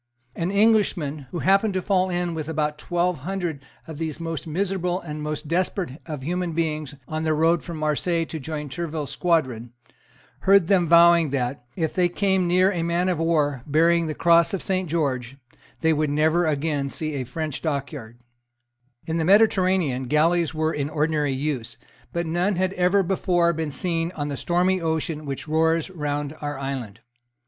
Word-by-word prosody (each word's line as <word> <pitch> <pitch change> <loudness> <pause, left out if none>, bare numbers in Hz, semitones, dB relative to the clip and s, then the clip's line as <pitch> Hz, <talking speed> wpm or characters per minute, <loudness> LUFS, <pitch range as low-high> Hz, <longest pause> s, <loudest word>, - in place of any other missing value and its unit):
An 170 +1 -2
Englishman, 195 - +2
who 175 - -5
happened 195 +2 +3
to 185 - 0
fall 185 -1 +2
in 175 -1 -1
with 155 -1 -4
about 150 -1 -1
twelve 175 -1 -1
hundred 175 -2 -3 0.3
of 160 -2 -8
these 160 -2 -3
most 165 -2 -5
miserable 180 +1 -1
and 150 -3 -7
most 150 0 -4
desperate 175 -2 -2
of 150 -5 -5
human 175 +2 -2
beings 155 -3 -2
on 155 0 -3
their 155 -1 +1
road 165 +2 +3
from 170 -2 -6
Marseilles 160 +2 0
to 160 - -5
join 150 +1 -5
Tourville's 155 0 -4
squadron, 130 -9 0 0.7
heard 195 -2 +5
them 180 -3 +3
vowing 170 -1 +6
that, 125 -2 -2
if 160 -3 -1
they 180 -1 +2
came 190 0 +1
near 185 +2 +4
a 175 -4 -2
man 170 +2 0
of 175 -3 -1
war 150 -5 +1
bearing 165 +3 +3
the 155 - -3
cross 170 +3 +4
of 190 - -5
Saint 185 -2 -1
George, 135 -5 -1 0.4
they 160 0 +3
would 155 -1 0
never 160 +4 +2
again 145 -2 -1
see 155 +3 -4
a 135 -2 -2
French 155 +3 -4
dockyard, 140 -6 -4 0.9
In 165 0 -2
the 165 - 0
Mediterranean 185 - +3
galleys 165 +4 +2
were 155 0 -1
in 145 -1 -2
ordinary 150 -1 0
use: 130 -4 -3 0.3
but 170 0 -2
none 175 +5 0
had 185 +1 0
ever 185 +2 +3
before 175 -2 +1
been 160 -1 -3
seen 165 +2 -2
on 145 -1 -3
the 140 - -3
stormy 180 +5 +1
ocean 160 -2 -2
which 135 +2 -5
roars 160 +2 +1
round 145 -3 -3
our 145 -1 -3
island. 130 -6 -5
160 Hz, 175 wpm, -24 LUFS, 150-175 Hz, 0.9 s, vowing